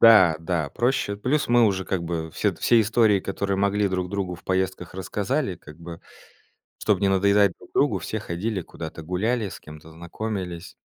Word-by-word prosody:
Да, 95 -8 +8
да, 80 -2 -1
проще. 120 -4 0
Плюс 130 +8 0
мы 120 -1 +5
уже 95 -2 0
как 95 -3 -2
бы 80 -1 -3
все - - 0
д - - -15
все 120 -1 +5
истории, 110 -1 +3
которые 100 +1 -2
могли, 100 +1 +2
друг 95 -1 -2
другу 95 -2 -3
в 90 - -19
поездках 95 -1 -1
рассказали, 100 +4 -2
как 75 -2 -14
бы. 85 -1 -9 0.8
Чтоб 105 -4 +2
не 100 - +3
надоедать 100 0 +4
друг - - -16
другу, - - +3
все - - -4
ходили 95 +3 -3
куда-то, 80 0 -8
гуляли, 100 +6 -1
с - - -9
кем-то 75 +1 -12
знакомились. 85 0 -5
95 Hz, 180 wpm, -24 LUFS, 85-105 Hz, 0.8 s, Да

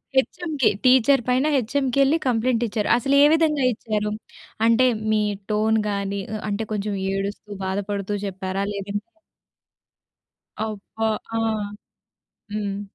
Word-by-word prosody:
హెచ్‌ఎంకి, 295 0 +1 0.2
teacher 260 +1 +5
పైన 255 +3 +3
హెచ్‌ఎంకెళ్లి 270 +4 +2
కంప్లెయింటిచ్చారు. 230 -2 0
అసలే 275 +3 +3
విధంగా 305 -4 +2
ఇచ్చారు? 210 -1 -2 0.5
అంటే 230 +3 +5 0.3
మీ 215 0 +3 0.3
టోన్ 220 +1 +2
గాని, 200 0 -2 0.2
ఆహ్, 215 - -5
అంటే 205 +2 -1
కొంచెం 205 0 -2 0.2
ఏడుస్తూ, 200 +1 -4 0.2
బాధపడుతూ 200 +1 -2
చెప్పారా? 190 0 -3
లేదంటే 200 - -4 1.5
అబ్బా! 220 +1 -4 0.3
ఆ! - - +1 1.2
హ్మ్. 205 -1 -2
220 Hz, 100 wpm, -23 LUFS, 200-255 Hz, 1.5 s, teacher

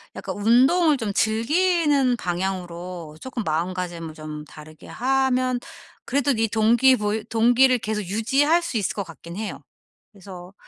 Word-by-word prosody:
약간 - - -6
운동을 265 - +4
좀 220 -5 -3
즐기는 280 - +2
방향으로 175 -3 -5
쪼끔 260 -3 -5
마음가짐을 170 -1 -3
좀 155 -1 -8
다르게 155 0 -14
하면 255 -1 0 0.5
그래도 280 +1 +1
이 225 0 +1
동기 230 +4 +4
보이 210 -1 -2
동기를 245 +3 +4
계속 215 -2 -3
유지할 270 - +1
수 335 -8 -3
있을 205 - -1
것 200 - -2
같긴 170 +1 -11
해요. 215 0 -5 0.5
그래서 185 -3 -12
220 Hz, 300 characters per minute, -23 LUFS, 180-260 Hz, 0.5 s, 운동을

